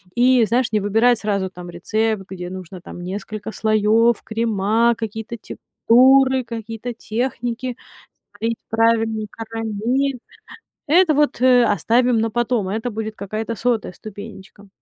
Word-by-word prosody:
И, 250 0 +4
знаешь, 240 +3 0
не 215 - +2
выбирать 225 +4 +3
сразу 200 -3 -1
там 180 -1 -10
рецепт, 215 +4 -1
где 180 -2 -6
нужно 185 -1 -9
там 175 - -10
несколько 205 +3 -6
слоёв, 220 +2 +2
крема, 225 +1 +1
какие-то 220 +1 -5
текстуры, 260 +4 +3
какие-то 225 +1 -6
техники, 240 +1 -3 0.6
слить 230 0 -1
правильные 225 -1 +1
карамель. 225 +4 -2 0.7
Это 330 +2 +5
вот, 295 -4 +1
э, 250 -1 +6
оставим 235 +4 +2
на 225 +1 0
потом, 240 -4 0
и - - -1
это 235 +2 -3
будет 220 0 -5
какая-то 215 +3 -4
100 230 -1 -1
ступенечка. 205 0 -11
225 Hz, 130 wpm, -20 LUFS, 210-240 Hz, 0.7 s, э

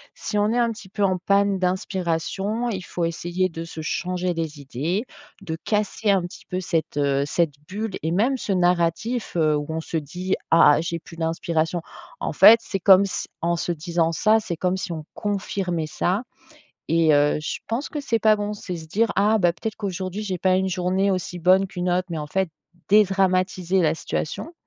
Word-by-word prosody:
si 210 - -3
on 210 +1 +2
est 240 - 0
un 235 -1 +3
petit 200 -3 -12
peu 205 0 -2
en 185 -1 +2
panne 200 +1 +2
d'inspiration, 190 +4 -1
il 190 -4 -3
faut 175 -2 -3
essayer 175 +2 -1
de 165 0 -6
se 165 -1 -9
changer 180 +2 -2
les 160 -3 -4
idées, 155 - -2 0.4
de 160 -4 -4
casser 210 0 0
un 195 -2 +3
petit 175 - -9
peu 185 - -2
cette, 165 -5 -2
heu, 140 -1 +2
cette 160 -1 0 0.2
bulle 210 +1 -4
et 160 - 0
même 235 +9 +2
ce 210 - -4
narratif, 180 +6 +1
heu, 155 -2 +3
où 145 0 -3
on 160 0 -2
se 165 - -7
dit: 180 +5 -2 0.2
«Ah! 155 -2 +6
J'ai 170 0 -3
plus 165 - -13
d'inspiration!», 165 0 -1 0.4
en - - -3
fait, 230 +1 +8
c'est 195 - -4
comme 195 +1 +7
si 190 - -4
en 170 +1 +1
se 175 - -2
disant 165 +1 0
ça, 215 +7 +3
c'est 170 -5 -4
comme 180 +1 0
si 185 - -4
on 155 -2 -5
confirmait 190 -5 -2
ça 185 +8 -1 0.7
et 165 -2 +4
heu, 145 +1 +3
je - - -4
pense 235 +6 -2
que 295 - -3
c'est 235 -5 0
pas 215 0 +5
bon, 205 0 -3
c'est 180 -3 -6
se 160 -1 -9
dire: 215 +6 +1
«Ah, 210 +2 +4
bah, 175 -3 +3
peut-être 220 +4 -5
qu'aujourd'hui 190 0 -4
j'ai 190 -4 -3
pas 185 +1 +3
eu - - +3
une 190 - -1
journée 185 +2 +1
aussi 180 -1 -3
bonne 185 +3 +4
qu'une 180 -1 -3
autre» 180 +1 +1
mais 160 - -3
en 150 - -4
fait, 190 +3 0 0.4
dédramatiser 190 -2 +3
la 160 -1 +2
situation, 230 - -4
185 Hz, 205 wpm, -23 LUFS, 165-200 Hz, 0.7 s, fait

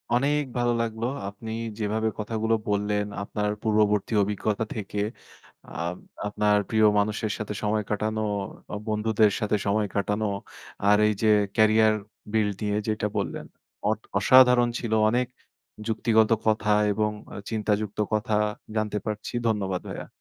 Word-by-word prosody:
অনেক 145 +4 +2 0.2
ভালো 120 0 +2
লাগলো। 115 0 -2 0.2
আপনি 110 +2 -8 0.3
যেভাবে 110 +1 0
কথাগুলো 110 +1 0
বললেন 105 0 0 0.2
আপনার 105 0 -2
পূর্ববর্তী 105 -1 +2
অভিজ্ঞতা 105 +2 -1
থেকে। 105 -1 -4 0.7
আ - - -14 0.6
আপনার 105 0 +2
প্রিয় 110 -1 +4
মানুষের 105 +1 0
সাথে 105 -1 -4
সময় 105 0 +1
কাটানো, 110 +1 -1 0.5
অ - - -1
বন্ধুদের 110 0 +2
সাথে 105 0 +1
সময় 105 +1 +2
কাটানো 105 +2 0 0.6
আর 105 0 +6
এইযে 105 +1 0 0.3
ক্যারিয়ার 110 0 +5 0.4
বিল্ড 105 -3 +1
নিয়ে 105 0 0
যেইটা 105 -1 0
বললেন। - - -3 0.4
অট - - 0 0.2
অসাধারণ 125 -2 +6
ছিল 115 -2 -2 0.2
অনেক 125 +2 +1 0.6
যুক্তিগত 110 -1 +3 0.2
কথা 110 -1 +2 0.2
এবং 105 0 +1 0.4
চিন্তাযুক্ত 105 -1 -1
কথা 105 0 +1 0.4
জানতে 105 -1 0
পারছি। 105 +1 -4
ধন্যবাদ 95 -4 0
ভাইয়া। - - -6
110 Hz, 130 wpm, -26 LUFS, 105-110 Hz, 0.7 s, আর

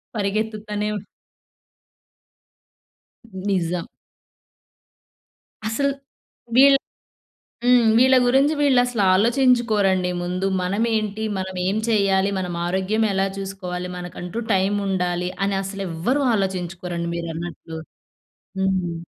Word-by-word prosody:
పరిగెత్తుతనే 210 0 -2 2.4
నిజం. 185 -3 -1 1.8
అసల్ 280 +6 0 0.6
వీళ్ 275 +2 +7 0.9
హ్మ్. 245 -2 +5
వీళ్ళ 260 +1 +6
గురించి 270 +4 +4
వీళ్ళుసలు 245 -5 +3
ఆలోచించుకోరండి 220 -5 +3
ముందు. 180 +2 -2 0.2
మనమేంటి? 215 +2 -1
మనమేం 185 +1 -2
చెయ్యాలి? 200 -3 +2
మనమారోగ్యం 185 +4 -1
ఎలా 195 0 +1
చూసుకోవాలి? 185 -2 -5
మనకంటూ 180 +3 -6
టైముండాలి 190 -2 0 0.2
అని 200 0 0
అసలు 195 +1 -5
ఎవ్వరూ 235 - 0
ఆలోచించుకోరండి 180 -3 -3
మీరన్నట్లు. 165 -1 -6 0.8
హ్మ్. 185 -3 0
195 Hz, 75 wpm, -22 LUFS, 180-220 Hz, 2.4 s, వీళ్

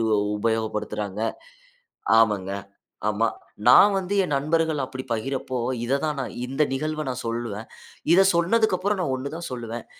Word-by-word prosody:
ஒ - - +2 0.2
உபயோகப்படுத்துறாங்க. 105 -2 -2 1.0
ஆமாங்க. 105 -4 +2 0.6
ஆமா. 105 +2 +2 0.4
நான் 195 +11 +8
வந்து 190 +1 -2
என் 150 - -2
நண்பர்கள் 155 +1 +1
அப்பிடி 130 0 -5
பகிரப்ப, 130 +4 -3 0.3
இத 130 +4 +1
தான் 150 -2 -1
நான் 130 - -4
இந்த 135 +4 +1
நிகழ்வ 155 +3 -2
நான் 125 0 -4
சொல்லுவேன். 115 -2 -4 0.5
இத 185 +3 +7
சொன்னதற்கப்பறம் 190 +2 +2
நான் 150 - -1
ஒன்னு 135 +2 -4
தான் 170 0 -5
சொல்லுவேன். 120 -2 -6
130 Hz, 140 wpm, -24 LUFS, 115-160 Hz, 1.0 s, நான்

